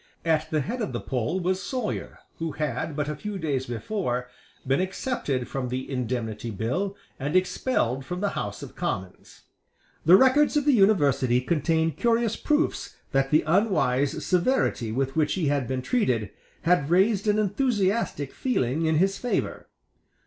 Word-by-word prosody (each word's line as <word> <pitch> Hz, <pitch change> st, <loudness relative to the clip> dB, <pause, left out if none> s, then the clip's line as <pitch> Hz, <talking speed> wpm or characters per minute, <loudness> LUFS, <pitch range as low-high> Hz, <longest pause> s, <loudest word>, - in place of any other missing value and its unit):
At 160 Hz, -1 st, +1 dB
the 155 Hz, -1 st, +1 dB
head 240 Hz, -, -4 dB
of 210 Hz, -, -3 dB
the -, -, -2 dB
poll 130 Hz, +7 st, -2 dB
was 185 Hz, +1 st, 0 dB
Sawyer, 250 Hz, -5 st, -4 dB, 0.2 s
who 165 Hz, -2 st, -3 dB
had, 150 Hz, 0 st, -3 dB
but 150 Hz, -1 st, -1 dB
a 150 Hz, -, -2 dB
few 205 Hz, +7 st, -5 dB
days 140 Hz, -7 st, -2 dB
before, 125 Hz, -, -2 dB, 0.4 s
been 135 Hz, +5 st, +2 dB
excepted 185 Hz, -, -2 dB
from 130 Hz, -2 st, -3 dB
the 130 Hz, +1 st, -3 dB
Indemnity 120 Hz, -4 st, -3 dB
Bill 125 Hz, -, -2 dB, 0.2 s
and 145 Hz, +5 st, -2 dB
expelled 180 Hz, -, +1 dB
from 180 Hz, +7 st, -5 dB
the 200 Hz, +1 st, 0 dB
House 100 Hz, 0 st, -4 dB
of -, -, -10 dB
Commons. 95 Hz, -1 st, -5 dB, 0.6 s
The 170 Hz, +4 st, +8 dB
records 280 Hz, +5 st, +4 dB
of 290 Hz, -, +1 dB
the 290 Hz, -, +5 dB
University 145 Hz, -, +4 dB
contain 160 Hz, +4 st, +1 dB
curious 230 Hz, -, +1 dB
proofs 300 Hz, +2 st, 0 dB, 0.2 s
that 135 Hz, -1 st, +2 dB
the 155 Hz, +2 st, +4 dB
unwise 155 Hz, -, +1 dB
severity 180 Hz, -, +1 dB
with 135 Hz, +3 st, -1 dB
which 155 Hz, -2 st, +2 dB
he 165 Hz, -7 st, 0 dB
had 140 Hz, -4 st, 0 dB
been 130 Hz, -1 st, -2 dB
treated 125 Hz, -, 0 dB, 0.3 s
had 165 Hz, -4 st, +2 dB
raised 200 Hz, +4 st, +3 dB
an 210 Hz, 0 st, +3 dB
enthusiastic 205 Hz, -, 0 dB
feeling 160 Hz, -, 0 dB
in 160 Hz, -, +2 dB
his 195 Hz, +5 st, +2 dB
favour. 245 Hz, -, -2 dB
160 Hz, 160 wpm, -26 LUFS, 130-200 Hz, 0.6 s, The